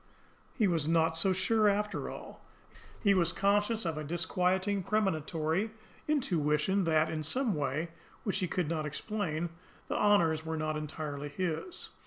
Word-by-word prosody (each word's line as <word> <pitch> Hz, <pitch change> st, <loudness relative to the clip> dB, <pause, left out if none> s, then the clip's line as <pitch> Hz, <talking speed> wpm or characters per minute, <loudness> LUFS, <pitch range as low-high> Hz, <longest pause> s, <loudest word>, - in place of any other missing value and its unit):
He 220 Hz, -5 st, +3 dB
was 165 Hz, -4 st, +1 dB
not 165 Hz, 0 st, +3 dB
so 190 Hz, +4 st, +2 dB
sure, 210 Hz, +3 st, +3 dB
after 210 Hz, +1 st, -1 dB
all. -, -, -9 dB, 0.6 s
He 200 Hz, -2 st, +5 dB
was 175 Hz, -3 st, +3 dB
conscious 205 Hz, +3 st, +1 dB
of 160 Hz, -2 st, -1 dB
a -, -, -4 dB
disquieting, 185 Hz, +4 st, 0 dB
premonitory 180 Hz, -2 st, 0 dB, 0.4 s
intuition 180 Hz, -, +1 dB
that, 160 Hz, -1 st, +3 dB
in 155 Hz, -, -2 dB
some 230 Hz, -, 0 dB
way 150 Hz, +3 st, -1 dB, 0.3 s
which 195 Hz, -2 st, -1 dB
he 185 Hz, -, 0 dB
could 175 Hz, -1 st, -1 dB
not 155 Hz, -1 st, -1 dB
explain, 175 Hz, -1 st, -2 dB, 0.4 s
the -, -, -1 dB
honours 170 Hz, -7 st, +3 dB
were 160 Hz, 0 st, -3 dB
not 155 Hz, 0 st, -1 dB
entirely 150 Hz, -1 st, -4 dB
his. 175 Hz, -, -4 dB
170 Hz, 150 wpm, -31 LUFS, 155-200 Hz, 0.6 s, He